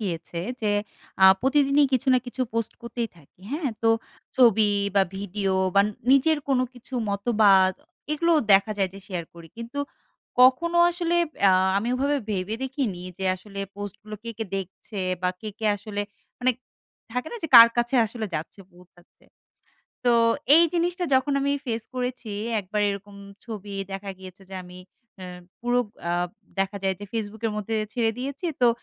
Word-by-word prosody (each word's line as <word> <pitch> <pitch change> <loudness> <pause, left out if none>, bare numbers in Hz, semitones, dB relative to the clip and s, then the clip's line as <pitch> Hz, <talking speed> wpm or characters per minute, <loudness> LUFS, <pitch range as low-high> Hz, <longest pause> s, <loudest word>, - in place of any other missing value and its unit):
গিয়েছে 170 -4 -4 0.2
যে, 215 - -1 0.6
আ - - +10 0.2
প্রতিদিনই 280 +2 +3
কিছু 260 +1 +1
না - - +5
কিছু 250 +1 -7
পোস্ট 230 -1 -1
করতেই 235 0 -3
থাকি, 165 +2 -22
হ্যাঁ? 295 -4 -1
তো 225 - +4 0.5
ছবি 220 -4 +5 0.2
বা, 195 - +5
ভিডিও 195 0 -2 0.2
বা 200 - +7 0.3
নিজের 295 +3 +4
কোনো 260 -2 +3
কিছু 245 +2 -11 0.2
মতবাদ, 200 -3 +4 0.4
এগুলোও 335 +1 +3
দেখা 200 +3 +5
যায় 195 -1 +2
যে 195 - -8
শেয়ার 180 -4 -4
করি। 165 -1 -12
কিন্তু 235 +4 -7 0.6
কখনো 300 +7 +5
আসলে 345 0 -1 0.3
আ - - +6 0.3
আমি 220 +4 -2
ওভাবে 280 +3 +1
ভেবে 195 +2 -2
দেখিনি 255 -9 -3 0.2
যে, 190 - -3
আসলে 200 +1 -11 0.2
পোস্টগুলো 205 +1 -7
কে, 230 - -5
কে 225 - -2
দেখছে? 195 +2 -7 0.2
বা, 180 - +2
কে, 215 - -6
কে 220 - -2
আসলে 205 0 -5 0.4
মানে 255 +1 +3 0.6
থাকে 250 +5 -2
না? - - -4
যে, 325 - -3
কার 230 0 +11
কাছে 240 +2 0
আসলে 220 0 -5
যাচ্ছে? 160 +6 -5
পৌঁছাচ্ছে? 175 0 -22 0.8
তো, - - +5 0.5
এই 335 - +7
জিনিসটা 350 +1 0
যখন 265 +2 +2
আমি 280 - +1
ফেস 230 -2 -2
করেছি, 250 -3 -3 0.3
একবার 205 +2 -2
এরকম 200 0 -6 0.3
ছবি 205 -3 -7 0.2
দেখা 195 +1 -5
গিয়েছে 185 0 -12
যে, - - -6
আমি 180 0 -12 0.4
এ - - -6 0.4
পুরো 245 +1 +2 0.3
আ - - +1 0.5
দেখা 195 +1 0
যায় 190 -1 +1
যে 205 - -7
Facebook 220 -1 -4
এর - - -2
মধ্যে 210 +2 -3 0.2
ছেড়ে 230 -2 +1
দিয়েছি, 280 +6 -5 0.2
তো 245 - +6
220 Hz, 165 wpm, -25 LUFS, 195-255 Hz, 0.8 s, কার